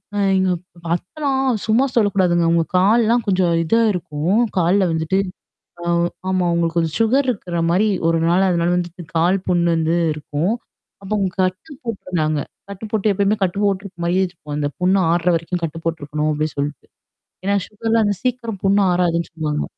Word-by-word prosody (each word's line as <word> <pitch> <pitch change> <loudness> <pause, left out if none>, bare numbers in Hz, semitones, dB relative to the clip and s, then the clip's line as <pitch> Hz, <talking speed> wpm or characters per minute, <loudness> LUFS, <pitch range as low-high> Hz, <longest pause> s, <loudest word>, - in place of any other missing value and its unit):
அ - - 0 0.2
எங்க 190 -1 +2
அப் 170 -1 -13
அத்தல்லாம் 265 - -1
சும்மா 230 +5 +3
சொல்லக்கூடாதுங்க. 185 -6 +2
அவுங்க 165 0 +3
கால்லாம் 225 +4 +3
கொஞ்சம் 185 -3 +2
இதா 225 +8 +2
இருக்கும். 170 +4 -1 0.2
கால்ல 185 +3 +3
வந்துட்டு 160 +4 0 0.6
ஆ, - - -6 0.4
ஆமா 185 -1 +1
அவுங்களுக்கு 170 0 0
கொஞ்சம் 160 -1 0
சுகர் 260 +5 +3
இருக்கிற 180 -7 -3
மாரி 195 +5 +3 0.2
ஒரு 165 0 +3
நாள் 185 +3 +3
அதனால 170 0 +1
வந்துட்டு 175 0 -4
கால் 175 +4 +3
புண்ணு 175 -1 +2
வந்து 165 +1 +1 0.2
இருக்கும். 150 +6 -2 0.5
அப்ப 195 +1 -10
அவுங்க 195 -3 0
கட்டு 185 - -3
போட்டுருந்தாங்க. 175 -9 -2 0.3
கட்டு 200 +2 -7
போட்டு 215 -1 +1
எப்பயுமே 200 +2 +1
கட்டு 190 +2 -1
போட்டுருக்கு 195 -3 -2
மாரியே 185 +2 +2
வச்சிக்குவோம். 150 -5 -7
அந்த 145 -1 0
புண்ணு 185 +2 +3
ஆறுற 175 +1 +2
வரைக்கும் 170 +1 -3
கட்டு 165 0 -3
போட்டுருக்கணும் 155 -2 -2
அப்பிடின்னு 155 +1 -2
சொல்ட்டு. 145 -1 -4 0.6
ஏன்னா, 200 +1 +2
சுகர்லாம் 225 +1 0
அந்த 205 -2 0
சீக்கிரம் 235 -5 -2
புண்ணு 200 +1 +4
ஆறாதுன்னு 170 -1 0
சொல்லுவாங்க. 150 -2 -2
180 Hz, 165 wpm, -20 LUFS, 165-205 Hz, 0.6 s, புண்ணு